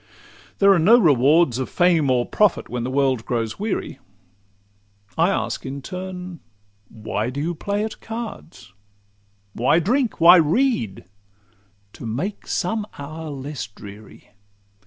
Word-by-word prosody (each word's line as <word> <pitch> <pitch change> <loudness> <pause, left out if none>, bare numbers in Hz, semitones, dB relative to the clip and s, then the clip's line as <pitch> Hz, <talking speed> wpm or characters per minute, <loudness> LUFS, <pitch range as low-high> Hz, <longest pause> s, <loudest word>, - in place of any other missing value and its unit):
'—There 200 0 +6
are 185 - +2
no 210 +9 +6
rewards 145 - +4
Of 130 - -3
fame 170 -5 +2
or 125 -1 +2
profit 210 -4 +1
when 120 -1 -3
the 125 - -3
world 130 -3 +1
grows 115 - -3
weary. 215 0 -3 1.2
I 165 +3 +3
ask 195 - -2
in 135 0 -6
turn,—Why 115 - -7
do 135 +3 -5
you 165 +4 -2
play 200 +5 -2
at 220 - -6
cards? 100 - -8 0.8
Why 125 +7 +2
drink? 235 - 0
Why 175 +2 +8
read?—To 100 - -3
make 150 - -4
some 210 +4 -2
hour 155 +3 -7
less 140 -3 -6
dreary. 100 +1 -14
140 Hz, 125 wpm, -22 LUFS, 110-180 Hz, 1.2 s, Why